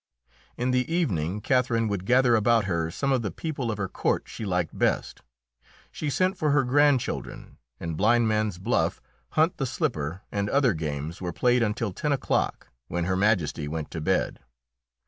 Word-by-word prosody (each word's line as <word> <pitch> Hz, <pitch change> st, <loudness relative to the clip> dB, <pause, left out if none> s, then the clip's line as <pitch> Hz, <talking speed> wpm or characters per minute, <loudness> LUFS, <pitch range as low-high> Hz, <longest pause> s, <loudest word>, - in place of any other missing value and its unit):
In 125 Hz, +1 st, 0 dB
the 125 Hz, +4 st, 0 dB
evening 100 Hz, -, 0 dB
Catherine 120 Hz, -3 st, +2 dB
would 100 Hz, -2 st, -3 dB
gather 125 Hz, -1 st, +5 dB
about 115 Hz, 0 st, +3 dB
her 85 Hz, -4 st, -1 dB
some 135 Hz, +11 st, -1 dB
of 130 Hz, -3 st, +2 dB
the 105 Hz, -, -2 dB
people 140 Hz, -, -4 dB
of 110 Hz, -, -2 dB
her 95 Hz, -2 st, -2 dB
court -, -, 0 dB
she 110 Hz, -, -7 dB
liked 90 Hz, -4 st, -1 dB
best. -, -, 0 dB, 0.7 s
She 150 Hz, -, -3 dB
sent 185 Hz, +6 st, +1 dB
for 155 Hz, -, +1 dB
her 145 Hz, -1 st, +4 dB
grandchildren, 140 Hz, 0 st, +1 dB, 0.2 s
and 85 Hz, -1 st, -4 dB
blind 115 Hz, +6 st, +3 dB
man's 110 Hz, -3 st, 0 dB
buff, 110 Hz, +7 st, 0 dB, 0.3 s
hunt 160 Hz, +3 st, +2 dB
the 135 Hz, -, -1 dB
slipper 95 Hz, -, -2 dB
and 100 Hz, 0 st, -1 dB
other 135 Hz, -3 st, +3 dB
games 75 Hz, +1 st, -4 dB
were 90 Hz, -1 st, -2 dB
played 125 Hz, +6 st, +2 dB
until 110 Hz, -2 st, -1 dB
ten 150 Hz, +10 st, -2 dB
o'clock, 140 Hz, -, -1 dB, 0.2 s
when 85 Hz, +3 st, -2 dB
Her 95 Hz, +1 st, 0 dB
Majesty 90 Hz, -7 st, +1 dB
went 80 Hz, 0 st, -4 dB
to 80 Hz, -, -5 dB
bed. -, -, 0 dB
110 Hz, 175 wpm, -26 LUFS, 90-130 Hz, 0.7 s, gather